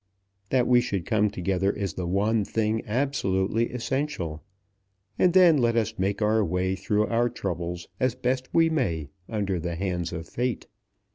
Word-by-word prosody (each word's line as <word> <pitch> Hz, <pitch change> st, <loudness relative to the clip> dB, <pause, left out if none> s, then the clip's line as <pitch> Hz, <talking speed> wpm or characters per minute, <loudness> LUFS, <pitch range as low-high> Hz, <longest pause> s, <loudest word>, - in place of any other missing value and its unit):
That 125 Hz, -2 st, +3 dB
we 125 Hz, -1 st, +5 dB
should 100 Hz, -8 st, -3 dB
come 105 Hz, -1 st, +2 dB
together 95 Hz, +1 st, 0 dB
is 100 Hz, -4 st, -3 dB
the 90 Hz, -2 st, -4 dB
one 105 Hz, +4 st, +1 dB
thing 110 Hz, +1 st, 0 dB
absolutely 110 Hz, -3 st, 0 dB
essential; 125 Hz, -, -3 dB, 0.8 s
and 180 Hz, -, +5 dB
then 175 Hz, -3 st, +6 dB
let 120 Hz, -2 st, +2 dB
us 115 Hz, -4 st, +1 dB
make 100 Hz, +3 st, 0 dB
our 110 Hz, +1 st, +3 dB
way 90 Hz, +1 st, 0 dB
through 105 Hz, +2 st, +1 dB
our 120 Hz, +2 st, +1 dB
troubles 85 Hz, -2 st, -4 dB
as 130 Hz, -2 st, +1 dB
best 130 Hz, 0 st, -1 dB
we 165 Hz, -1 st, +4 dB
may 85 Hz, -, -1 dB, 0.2 s
under 100 Hz, -5 st, -1 dB
the 85 Hz, 0 st, -3 dB
hands 90 Hz, -2 st, -2 dB
of 80 Hz, -1 st, -6 dB
Fate. 125 Hz, +3 st, -2 dB
105 Hz, 160 wpm, -26 LUFS, 90-125 Hz, 0.8 s, then